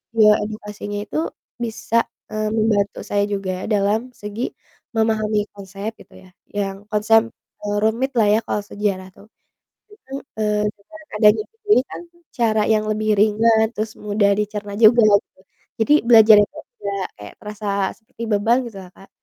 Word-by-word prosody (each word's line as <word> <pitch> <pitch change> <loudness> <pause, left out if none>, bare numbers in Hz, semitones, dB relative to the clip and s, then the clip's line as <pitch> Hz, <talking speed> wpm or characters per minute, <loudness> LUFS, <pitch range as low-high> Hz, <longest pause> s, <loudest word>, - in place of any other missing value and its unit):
ya 215 -1 +6
edukasinya 210 -1 -6
itu 310 +9 -3 0.3
bisa, 230 0 0 0.3
eee, 215 0 -1
membantu 215 -2 +1
saya 205 0 +1
juga 190 -2 -3
dalam 215 +4 0
segi, 210 +4 -5 0.4
memahami 215 -1 +1
konsep 200 +1 -6
gitu - - -17
ya, 185 - -16 0.2
yang 195 -1 -3
konsep, 225 +2 +3 0.4
eee, 205 0 -1
rumit 235 +5 +1
lah 220 -3 +4
ya 215 - +4
kalau - - -1
sejarah 200 -2 -3
tuh, 205 - -17 0.7
itu 270 -10 -15 0.3
eee, 210 -1 +1
dengan 315 +11 -16
adanya 210 0 +5 0.2
jadi 420 - +5
kan, - - -7 0.3
cara 225 -4 +1
yang 215 -1 +2
lebih 215 0 -1
ringan 220 +1 +4
terus 215 0 -3
mudah 205 -1 +1
dicerna 210 -1 -4
juga 230 +1 +7 0.2
gitu, - - -34 0.4
jadi 225 - +4
belajar 220 -2 +8
itu 205 +8 -3 0.2
nggak 200 -2 -3
kayak 105 0 -10
terasa 210 0 -7 0.3
seperti 225 +1 -16
beban 225 +4 +3
gitulah 195 -4 -11
Kak, 195 - -17
210 Hz, 150 wpm, -21 LUFS, 205-225 Hz, 0.7 s, belajar